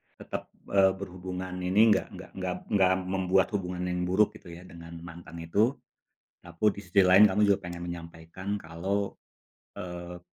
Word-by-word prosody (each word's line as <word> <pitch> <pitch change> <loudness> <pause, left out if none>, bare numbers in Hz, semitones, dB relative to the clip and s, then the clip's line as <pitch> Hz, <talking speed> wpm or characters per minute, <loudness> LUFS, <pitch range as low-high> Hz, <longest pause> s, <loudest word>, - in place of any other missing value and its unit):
tetap, - - -7 0.2
eee, 95 -1 +5
berhubungan 95 -1 -6
ini 100 +5 +4
nggak 95 - +2
nggak - - -10
nggak 90 -1 -2 0.2
nggak 95 -3 +4 0.2
membuat 95 0 +2
hubungan 90 -2 -3
yang 90 0 -1
buruk 100 +3 +3
gitu 85 - -13
ya 85 - -10
dengan 85 0 -11
mantan 85 -1 -10
itu, 105 +10 +2 0.7
tapi 85 +5 -5
di 100 - -8
sisi 95 +3 +4
lain 95 +3 +8
kamu 105 +3 +1
juga 100 - +4
pengen 85 0 -6
menyampaikan 85 +3 -6
kalau, 95 +5 -3 0.6
eee 90 -2 -7
90 Hz, 155 wpm, -28 LUFS, 85-95 Hz, 0.7 s, lain